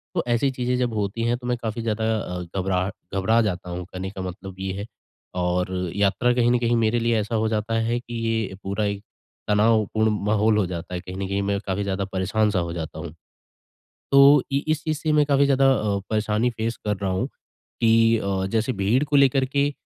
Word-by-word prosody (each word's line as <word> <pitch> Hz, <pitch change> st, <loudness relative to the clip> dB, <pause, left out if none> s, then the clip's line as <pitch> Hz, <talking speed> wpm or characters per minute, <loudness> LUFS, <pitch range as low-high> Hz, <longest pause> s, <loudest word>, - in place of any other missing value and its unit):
तो -, -, +1 dB
ऐसी 120 Hz, +3 st, +2 dB
चीज़ें 125 Hz, -1 st, -1 dB
जब 125 Hz, -2 st, 0 dB
होती 105 Hz, +2 st, -2 dB
है, 120 Hz, +1 st, +1 dB
तो 125 Hz, 0 st, -8 dB
मैं 125 Hz, 0 st, 0 dB
काफ़ी 110 Hz, +1 st, -3 dB
ज़्यादा 110 Hz, -1 st, -1 dB
अ, 90 Hz, -3 st, -4 dB
घबराह 95 Hz, 0 st, 0 dB, 0.3 s
घबरा 110 Hz, +4 st, +3 dB
जाता 90 Hz, -4 st, -2 dB
हूँ 90 Hz, 0 st, -5 dB
कहने 95 Hz, +1 st, -6 dB
का 95 Hz, -1 st, -7 dB
मतलब 95 Hz, +1 st, -7 dB
ये 95 Hz, 0 st, -3 dB
है। -, -, -5 dB, 0.6 s
और 90 Hz, +1 st, 0 dB, 0.2 s
यात्रा 100 Hz, +5 st, +2 dB
कहीं 120 Hz, -1 st, +3 dB
न 125 Hz, -, +4 dB
कहीं 120 Hz, 0 st, +1 dB
मेरे 115 Hz, +1 st, +2 dB
लिए 115 Hz, -1 st, +1 dB
ऐसा 110 Hz, +2 st, -2 dB
हो 110 Hz, 0 st, +1 dB
जाता 110 Hz, 0 st, -2 dB
है, 115 Hz, +2 st, 0 dB
कि 120 Hz, 0 st, -11 dB
ये 110 Hz, -4 st, -1 dB
पूरा 100 Hz, +2 st, -1 dB
एक 100 Hz, 0 st, -3 dB, 0.4 s
तनावपूर्ण 110 Hz, +1 st, +2 dB, 0.2 s
माहौल 105 Hz, +1 st, +3 dB
हो 105 Hz, -, +2 dB
जाता 90 Hz, 0 st, -6 dB
है। 90 Hz, -, -2 dB
कहीं 90 Hz, +1 st, -8 dB
न 95 Hz, -, -3 dB
कहीं 100 Hz, +1 st, -1 dB
मैं 100 Hz, 0 st, 0 dB
काफ़ी 95 Hz, +1 st, -1 dB
ज़्यादा 100 Hz, 0 st, -2 dB
परेशान-सा 100 Hz, +1 st, +1 dB
हो 85 Hz, -1 st, -3 dB
जाता 80 Hz, -2 st, -6 dB
हूँ। 80 Hz, 0 st, -6 dB, 1.0 s
तो 140 Hz, 0 st, +7 dB
इ 140 Hz, -, +2 dB
इस 155 Hz, -1 st, +1 dB
चीज़ 155 Hz, -2 st, -1 dB
से 155 Hz, 0 st, 0 dB
मैं 150 Hz, -1 st, +4 dB
काफ़ी 140 Hz, -1 st, +3 dB
ज़्यादा 135 Hz, -1 st, +3 dB
अ, 105 Hz, -5 st, 0 dB
परेशानी 110 Hz, +2 st, +1 dB
फेस 115 Hz, 0 st, -3 dB
कर 105 Hz, -1 st, +1 dB
रहा 95 Hz, -, 0 dB
हूँ। 95 Hz, 0 st, 0 dB, 0.5 s
की 115 Hz, 0 st, +4 dB
अ, 95 Hz, -2 st, -1 dB
जैसे 115 Hz, +3 st, +1 dB
भीड़ 105 Hz, +8 st, +2 dB
को 145 Hz, 0 st, +1 dB
लेकर 135 Hz, -1 st, +4 dB
के 140 Hz, +2 st, 0 dB
110 Hz, 215 wpm, -24 LUFS, 95-120 Hz, 1.0 s, तो